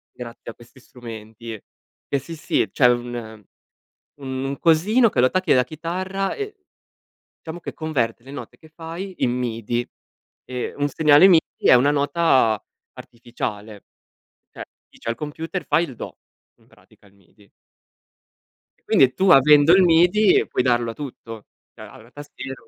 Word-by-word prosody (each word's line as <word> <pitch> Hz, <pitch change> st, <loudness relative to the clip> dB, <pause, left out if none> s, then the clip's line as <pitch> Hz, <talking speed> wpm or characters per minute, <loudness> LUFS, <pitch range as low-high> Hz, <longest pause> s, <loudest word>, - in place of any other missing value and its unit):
grazie 120 Hz, -1 st, -9 dB
a -, -, -15 dB
questi 120 Hz, +2 st, -19 dB
strumenti. 115 Hz, -2 st, -10 dB, 0.5 s
Eh, 140 Hz, -, -1 dB
sì, 165 Hz, +5 st, -9 dB
sì. 150 Hz, -, -1 dB
C'è 125 Hz, -, +4 dB
un 120 Hz, -3 st, -3 dB, 0.8 s
un 130 Hz, -1 st, -5 dB
un 135 Hz, +1 st, -4 dB
cosino 205 Hz, +9 st, +3 dB
che 200 Hz, -, -1 dB
lo 125 Hz, -, +5 dB
attacchi 185 Hz, +5 st, +1 dB
alla 125 Hz, -1 st, +4 dB
chitarra 185 Hz, +7 st, -4 dB
e 420 Hz, 0 st, -6 dB, 0.9 s
diciamo 165 Hz, +2 st, -8 dB
che -, -, -8 dB
converte 125 Hz, -8 st, -3 dB
le 135 Hz, -, -12 dB
note 145 Hz, -, -9 dB
che 160 Hz, -, -19 dB
fai 165 Hz, +4 st, -8 dB
in 120 Hz, -, +2 dB
M-I-D-I. 120 Hz, -1 st, -3 dB, 0.6 s
Eh, 125 Hz, -1 st, -5 dB
un 145 Hz, 0 st, -1 dB
segnale 150 Hz, +4 st, +5 dB
M-I-D-I 165 Hz, -3 st, +2 dB
è -, -, +8 dB
una 130 Hz, +4 st, +4 dB
nota 140 Hz, -, +2 dB, 0.3 s
artificiale. 110 Hz, -3 st, -8 dB, 0.7 s
Cioè, -, -, -9 dB, 0.2 s
dice -, -, -11 dB
al 115 Hz, -, 0 dB
computer: 160 Hz, +6 st, -6 dB
"Fai 160 Hz, +3 st, +2 dB
il 135 Hz, -, -9 dB
do." -, -, -8 dB, 0.4 s
In -, -, -28 dB
pratica -, -, -25 dB
il 100 Hz, -, -23 dB
M-I-D-I. 100 Hz, +1 st, -26 dB, 1.3 s
E -, -, -43 dB
quindi 130 Hz, -1 st, +3 dB
tu 190 Hz, 0 st, +1 dB
avendo 150 Hz, +1 st, +6 dB
il 190 Hz, -, +6 dB
M-I-D-I 180 Hz, +4 st, +4 dB
puoi 125 Hz, -, -1 dB
darlo 120 Hz, -2 st, +1 dB
a -, -, -10 dB
tutto. 115 Hz, -5 st, -9 dB, 0.3 s
Cioè -, -, -12 dB
allora, 110 Hz, -, -15 dB
il 120 Hz, -, -24 dB
tastino 145 Hz, -2 st, -9 dB
135 Hz, 160 wpm, -22 LUFS, 120-165 Hz, 1.3 s, è